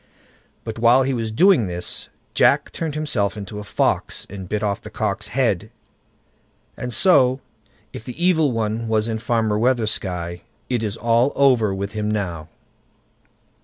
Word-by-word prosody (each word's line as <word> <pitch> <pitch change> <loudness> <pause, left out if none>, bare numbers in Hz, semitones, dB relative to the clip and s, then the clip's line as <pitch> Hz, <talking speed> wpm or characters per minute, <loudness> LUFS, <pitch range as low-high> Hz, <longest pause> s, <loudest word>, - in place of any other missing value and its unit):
But 115 0 -6
while 120 +3 +5
he 135 +1 0
was 115 -3 -2
doing 135 - +4
this, 90 0 -4 0.2
Jack - - +3
turned 160 -3 -4
himself 115 -10 -1
into 105 0 -7
a - - -6
fox, 100 - -1
and 95 -2 -8
bit 105 0 -2
off 100 -1 -1
the - - -9
cock's - - -2
head; - - 0 1.1
and 125 - -5
so 130 - +4 0.5
if - - -8
the 125 - -8
Evil 160 -6 +3
One 115 0 -2
was 110 0 +1
in 110 -1 -2
Farmer 110 -2 0
Weathersky, 95 -8 -1 0.3
it 120 -3 +1
is 105 -1 -2
all 120 +3 +2
over 125 -7 +4
with 100 +1 -3
him 105 0 -2
now. 90 -7 -3
110 Hz, 155 wpm, -21 LUFS, 105-125 Hz, 1.1 s, while